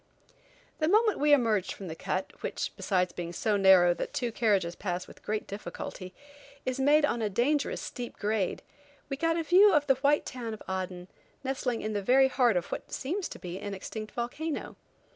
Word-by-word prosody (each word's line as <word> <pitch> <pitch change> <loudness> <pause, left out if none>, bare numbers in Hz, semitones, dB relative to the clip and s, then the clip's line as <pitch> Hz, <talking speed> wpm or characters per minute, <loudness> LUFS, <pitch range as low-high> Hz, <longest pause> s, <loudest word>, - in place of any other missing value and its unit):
The 310 - +2
moment 430 +4 +3
we 295 +1 +3
emerged 225 -9 +3
from 195 - -9
the 160 - -5
cut, 185 +3 -3
which, - - -3
besides 180 -3 0
being 170 -1 -5
so 210 +4 0
narrow 190 -3 +6
that - - -5
two 240 -2 -1
carriages 200 -7 +1
pass 180 -1 -3
with - - -15
great 215 0 -2
difficulty, 195 -2 -7 0.5
is 255 +1 -2
made 295 +3 +5
on 240 -5 -1
a 215 - 0
dangerous 270 +8 0
steep 245 -1 -6
grade, 210 -2 -1 0.5
we 275 - -1
got 330 +2 +1
a 330 - 0
view 380 +6 +6
of 300 -4 +3
the 270 - +5
white 290 +1 +3
town 235 -4 -5
of - - -13
Aden, 185 -1 -4 0.4
nestling 260 -3 -2
in 215 0 -2
the 205 - -1
very 265 +6 +5
heart 245 -6 +3
of 175 - -3
what - - -5
seems 350 +8 -3
to - - -8
be 180 0 -6
an 205 -1 -5
extinct 215 +3 -7
volcano. 285 +6 -4
225 Hz, 195 wpm, -29 LUFS, 190-285 Hz, 0.5 s, narrow